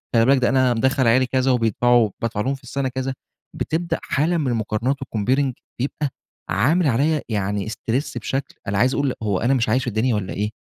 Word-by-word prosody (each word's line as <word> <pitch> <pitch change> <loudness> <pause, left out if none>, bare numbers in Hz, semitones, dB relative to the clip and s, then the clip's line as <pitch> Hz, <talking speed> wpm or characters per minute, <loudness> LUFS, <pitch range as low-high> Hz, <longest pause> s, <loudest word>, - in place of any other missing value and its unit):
خلي 115 0 +5
بالك 135 +2 +5
ده 125 - +2
أنا 130 -2 +3
مدخّل 130 +2 +2
عيالي 130 +3 +4
كذا، 130 +1 +1
وبيدفعوا 120 0 +3
وبادفع 115 -3 -2
لهم 135 +5 0
في 135 - -16
السنة 135 +1 -2
كذا، 130 +1 -3 0.4
بتبدأ 170 +2 -2
حالة 165 +5 +1
من 150 - -1
المقارنات 115 +2 0
وcomparing، 130 +4 0 0.3
بيبقى 145 +2 -2 0.4
عامل 145 - +2
عليّا 145 +5 +2
يعني 100 -1 -1
stress 120 +5 -2
بشكل، 135 0 -3
أنا 100 - -1
عايز 125 +5 +3
أقول 140 -2 0
هو 100 -3 0
أنا 125 +4 +2
مش 120 -4 +1
عايش 125 +4 +2
في - - -6
الدنيا 115 +2 +1
والّا 100 -3 -3
إيه؟ 105 +2 -1
125 Hz, 200 wpm, -22 LUFS, 110-135 Hz, 0.4 s, خلي